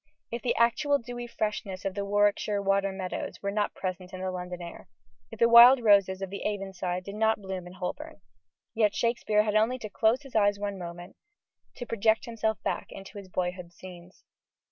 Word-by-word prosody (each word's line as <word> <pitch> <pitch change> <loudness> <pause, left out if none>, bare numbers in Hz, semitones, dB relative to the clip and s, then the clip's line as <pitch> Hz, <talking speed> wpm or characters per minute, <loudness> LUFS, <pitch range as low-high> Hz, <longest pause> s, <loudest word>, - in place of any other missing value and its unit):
If 235 0 -4
the 245 - 0
actual 260 +5 +3
dewy 240 -1 -7
freshness 210 -4 -4
of 195 - -1
the 200 +1 -3
Warwickshire 205 0 +1
water 195 0 +1
meadows 190 -1 -5
were 200 - -1
not 210 0 -1
present 185 -1 -5
in 185 - -6
the 185 0 -2
London 180 -1 -6
air 170 -1 -9 0.4
if - - -10
the 235 - +5
wild 240 +3 +9
roses 195 -3 +4
of 190 - -5
the 200 - -6
Avon 195 -2 -3
side 180 0 -3
did 200 - -8
not 220 +1 +1
bloom 190 -2 -6
in 180 - -11
Holborn 285 - -6 0.5
yet 215 -2 +2
Shakespeare 230 -3 +1
had 210 -1 -1
only 225 +4 +3
to 220 -4 -7
close 225 +7 +2
his 275 - -14
eyes 205 -1 +3
one 200 -1 -4
moment, 175 0 -9 0.6
to 245 - -6
project 220 -1 +1
himself 220 -2 -1
back - - -2
into 195 +2 -10
his 195 -2 -12
boyhood's 180 -1 -4
scenes. 180 -1 -13
205 Hz, 195 wpm, -28 LUFS, 185-225 Hz, 0.6 s, wild